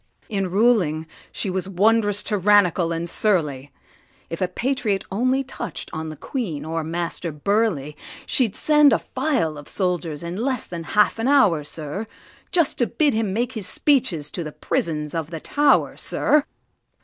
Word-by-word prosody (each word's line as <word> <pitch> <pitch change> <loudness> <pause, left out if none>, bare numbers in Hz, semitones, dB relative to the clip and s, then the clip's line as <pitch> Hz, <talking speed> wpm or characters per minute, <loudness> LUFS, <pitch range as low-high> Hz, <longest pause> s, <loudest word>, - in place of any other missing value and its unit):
In 195 -4 -1
ruling 185 -7 +2 0.3
she 195 - -2
was 190 +1 -2
wonderous 205 +2 +3
tyrannical 195 -4 +3
and 165 +1 -2
surly; 150 -9 0 0.6
If 165 - -5
a 185 - +2
patriot 225 0 -1
only 255 +6 +1
touch'd 260 0 -6
on 160 0 -4
the 155 - -7
Queen 165 - -4
or 165 0 -2
Master 170 +1 -3
Burleigh, 155 -2 0 0.3
She'd 230 -6 +1
send 300 -2 +5
a - - +4
file 165 - -1
of 145 - -12
soldiers 175 -5 -2
in 170 +2 -5
less 255 +1 -1
than 170 -2 -7
half 210 +2 +4
an 225 - 0
hour, 210 - +4
sir, 155 +8 -5 0.4
Just 340 -6 +2
to 240 - +2
bid 285 +3 +1
him 220 -3 0
make 235 +4 -1
his 210 -4 -4
speeches 230 - +1
to 175 - -4
the 155 - -6
prisons 150 -1 -2
of 165 -2 -3
the 165 -2 -6
Tow'r, 290 - +2
sir! 300 -1 +2
195 Hz, 160 wpm, -22 LUFS, 165-235 Hz, 0.6 s, send